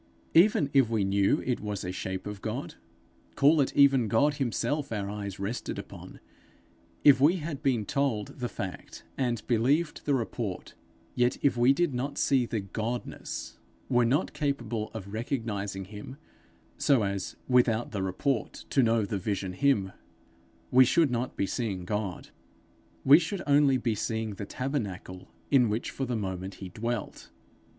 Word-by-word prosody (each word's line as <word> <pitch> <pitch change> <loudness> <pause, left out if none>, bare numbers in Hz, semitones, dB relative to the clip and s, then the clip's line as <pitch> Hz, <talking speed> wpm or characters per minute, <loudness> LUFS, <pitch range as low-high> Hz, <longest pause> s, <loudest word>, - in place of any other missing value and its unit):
Even 165 -5 +5
if 135 -5 +4
we 110 -3 +1
knew 100 0 +2
it 125 -2 0
was 105 -3 -4
a 90 - -2
shape 95 0 -4
of 105 -1 -6
God - - -4 0.6
call 145 +2 +5
it 135 - 0
even 135 -4 +5
God 145 +7 +2
himself 140 +2 -1
our 105 -3 -2
eyes 100 -2 -5
rested 100 +5 -4
upon; - - -9 0.8
if 135 -3 +7
we 155 +6 +5
had 155 -4 -5
been 125 -8 +1
told 125 -4 -1
the 120 -1 -2
fact 95 -5 -7
and 120 -5 -1
believed 135 +8 +1
the 145 - +3
report; 115 -5 -4 0.4
yet, 125 0 +1
if 140 -3 +3
we 120 +2 +5
did 155 +1 +1
not 140 +3 -3
see 130 -4 +2
the 110 -3 -2
Godness, 110 +5 -5 0.3
were 120 -2 +4
not 125 +6 +1
capable 120 -7 -2
of 100 -2 -7
recognizing 105 -5 -3
him, 105 +7 -9 0.6
so 135 -6 +3
as 100 -1 -3
without 120 -2 +3
the 100 - -3
report 110 +7 -2
to 135 - +4
know 115 -3 +2
the 100 0 -3
vision 95 -1 -3
him, 115 -5 +2 0.8
we 130 +1 +8
should 150 +2 +3
not 125 +1 -2
be - - +1
seeing 95 -3 -3
God, 100 -3 -3 0.8
we 145 +4 +9
should 180 +3 -3
only 140 -2 +4
be 120 -2 0
seeing 110 +1 -2
the 100 0 -7
tabernacle 100 -9 -4 0.2
in 125 -5 +5
which 110 +3 -2
for 135 - -3
the 125 -1 -2
moment 95 -2 -4
he 95 - -8
dwelt. 115 +3 -4
120 Hz, 160 wpm, -28 LUFS, 100-135 Hz, 0.8 s, we